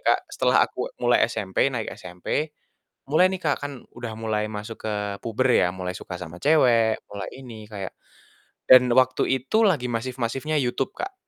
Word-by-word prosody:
Kak, - - +4
setelah - - +2
aku - - -5
mulai - - +4
SMP, 95 -2 -5
naik 115 -3 -3
SMP, 90 - -3 0.6
mulai 180 +5 +5
nih, 185 - -4
Kak, 145 -2 +2
kan 145 - -4 0.2
udah 120 -2 -6
mulai 110 -1 -1
masuk 110 +1 -6
ke 110 - -1 0.3
puber 120 +3 0
ya, 90 - +4
mulai 90 0 -5
suka 90 - -7
sama 85 0 -8
cewek, 120 -7 +4
mulai 100 -1 -5
ini 115 -5 -10
kayak 100 -3 -6 0.8
dan 125 -1 +9
waktu 130 0 +4
itu 135 - +2
lagi 140 -10 +1
masif-masifnya 130 +5 -2
YouTube, 130 +1 -1
Kak. 385 +2 -4
120 Hz, 165 wpm, -24 LUFS, 105-135 Hz, 0.8 s, dan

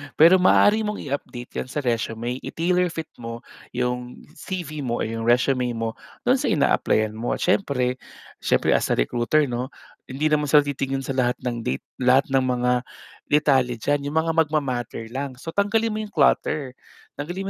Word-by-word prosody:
Pero 170 +4 +7
maaari 210 +4 +4
mong 210 0 -3
i-update 125 -3 -5
yan - - -16
sa 145 +3 -3
resume, 115 +1 -2
i-tailor 180 +2 0
fit 160 -1 -5
mo 115 0 -7 0.3
yung 125 0 -3 0.2
CV 165 -5 -5
mo 120 -1 -1
or - - -2
yung 115 0 -4
resume 125 +1 +2
mo, 115 0 -3 0.3
do'n - - +3
sa - - -1
in-applyan 110 0 +2
mo, 120 - -1
siyempre 130 -9 0 0.5
siyempre - - +2
as - - -1
a - - +2
recruiter 120 - +1
'no, 125 +3 -4 0.3
hindi 145 +4 -1
naman 150 -1 +2
sila 145 +1 +6
titingin 135 -1 -2
sa 135 0 -4
lahat 125 -1 +2 0.3
date 65 - -1 0.2
lahat 130 +2 +3
ng 135 -1 +2
mga 125 -1 +1 0.5
detalye 135 -4 +3
diyan 140 +5 -1
yung 155 +3 +1
mga 165 0 -1
magma-matter 130 -7 -1
lang 135 +1 -4
so 135 +6 -9
tanggalin 210 +5 +1
mo 215 - -3
yung 215 -1 -5
clutter, 135 -4 +1 0.4
tanggalin 180 +7 -4
135 Hz, 170 wpm, -23 LUFS, 125-155 Hz, 0.5 s, Pero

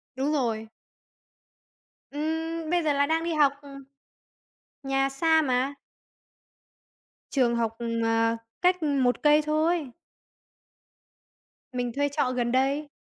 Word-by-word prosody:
Đúng 270 +3 -1
rồi. 225 -5 -1 1.4
Ừm, 320 +2 -3
bây 350 -1 +1
giờ 300 - +2
là 285 0 +2
đang 325 +2 0
đi 335 -1 -1
học, 290 -2 +4
ừm. 275 -1 -11 1.0
Nhà 270 0 +1
xa 320 +3 +3
mà. 260 0 0 1.6
Trường 245 -4 +2
học, 225 -1 -1
ừm, 230 -1 -2
à, 225 0 +2 0.2
cách, 360 -1 +3
ừm, 285 -4 +1
1 245 0 +1
cây 300 0 +5
thôi. 310 -1 0 1.8
Mình 245 -1 -2
thuê 285 +2 0
trọ 280 -3 0
gần 240 -1 -1
đây. 275 +4 +1
280 Hz, 125 wpm, -26 LUFS, 250-310 Hz, 1.8 s, cây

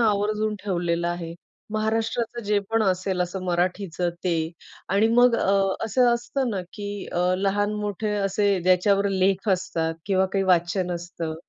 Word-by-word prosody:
आवर्जून 215 0 +1
ठेवलेलं 175 -3 -1
आहे. 170 -1 -4 0.4
महाराष्ट्राचं 225 +2 -1
जे 205 0 +2
पण 225 0 +2
असेल 185 -1 0
असं 180 +1 -2
मराठीचं 180 0 -1
ते 175 -2 +1 0.5
आणि 200 +4 +3
मग 245 0 +6
अ, 195 - +1 0.3
असं 240 +2 +3
असतं 240 +2 -1
ना 200 -3 -2
की 205 -1 -6
अ, - - -1 0.2
लहान-मोठे 205 +1 -1
असे 200 -1 +1
ज्याच्यावर 195 +3 +3
लेख 195 +1 +1
असतात 170 -3 -1
किंवा 190 -1 +2
काही 195 -1 +1
वाचन 180 0 +2
असतं 170 -2 -5
195 Hz, 140 wpm, -24 LUFS, 180-210 Hz, 0.5 s, मग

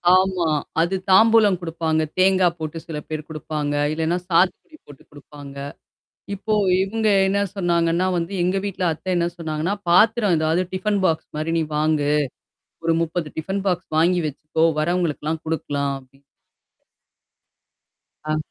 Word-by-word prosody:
ஆமா. 185 -3 +2 0.3
அது 170 +3 +1 0.2
தாம்பூலம் 220 -1 +6
குடுப்பாங்க. 160 -2 -1 0.2
தேங்காய் 185 -2 +4
போட்டு 155 +1 -5
சில 160 -2 -5
பேர் 155 -1 -5
குடுப்பாங்க. 150 -1 -3 0.2
இல்லனா 160 +2 0
சாத்துக்குடி 185 - +1
போட்டு 145 -2 -14
குடுப்பாங்க. 145 -1 -12 0.8
இப்போ 210 +2 -4 0.3
இவங்க 215 +3 0 0.2
என்ன 200 +1 +1 0.2
சொன்னாங்கன்னா 170 -1 +1
வந்து 170 +2 -2
எங்க 180 +2 +1
வீட்ல 195 -2 -3
அத்தை 160 +4 -6
என்ன 170 -1 +1
சொன்னாங்கன்னா, 160 +2 -2
பாத்திரம் 210 +2 +4
ஏதாவது 160 +3 +1
டிஃபன் 200 +2 0
பாக்ஸ் 160 -3 0
மாரி 155 +2 -2
நீ - - +2
வாங்கு. 150 -1 +1 0.8
ஒரு 165 - +3
30 165 0 -2
டிஃபன் 190 +5 -3
பாக்ஸ் 180 -1 -1
வாங்கி 175 +3 +3
வெச்சுக்கோ! 150 +2 -2 0.2
வரவங்கலுக்குலாம் 160 -2 -1
குடுக்கலாம் 145 -3 -2
அப்டின்னு 135 +1 -24 2.1
ஆ. 155 - +1
170 Hz, 130 wpm, -22 LUFS, 155-185 Hz, 2.1 s, தாம்பூலம்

